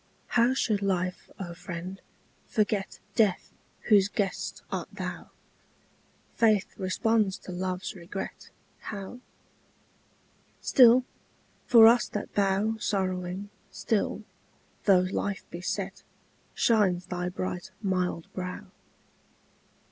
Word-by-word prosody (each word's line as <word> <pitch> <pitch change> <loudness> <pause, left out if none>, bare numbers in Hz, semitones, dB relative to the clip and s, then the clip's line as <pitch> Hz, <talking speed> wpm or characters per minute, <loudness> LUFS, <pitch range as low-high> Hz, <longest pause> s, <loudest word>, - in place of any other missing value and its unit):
How 240 +2 +3
should 215 -6 +1
life, 185 -2 -1
O 175 -3 -5
friend, 180 +2 -7 0.5
forget 210 -3 0 0.2
Death, 210 -6 +1 0.3
whose 200 -4 +5
guest 205 -2 -3
art - - -3
thou? - - -6 1.0
Faith 215 -4 +2
responds 200 +1 +1
to - - -10
love's 185 +1 -3
regret, 185 +2 -7 0.3
How? 205 +3 -7 1.4
Still, 250 0 +6 0.6
for 230 -2 +9
us 235 0 +6
that 210 - -5
bow 200 +2 +1
Sorrowing, 190 -1 -2 0.2
still, - - -1 0.6
though 190 -3 +6
life 200 -1 -2
be 170 - -6
set, 190 +1 -3 0.5
Shines 190 -6 +3
thy 180 0 -3
bright 180 0 -4
mild 180 -3 0
brow. 180 -1 -6
195 Hz, 100 wpm, -28 LUFS, 180-215 Hz, 1.4 s, for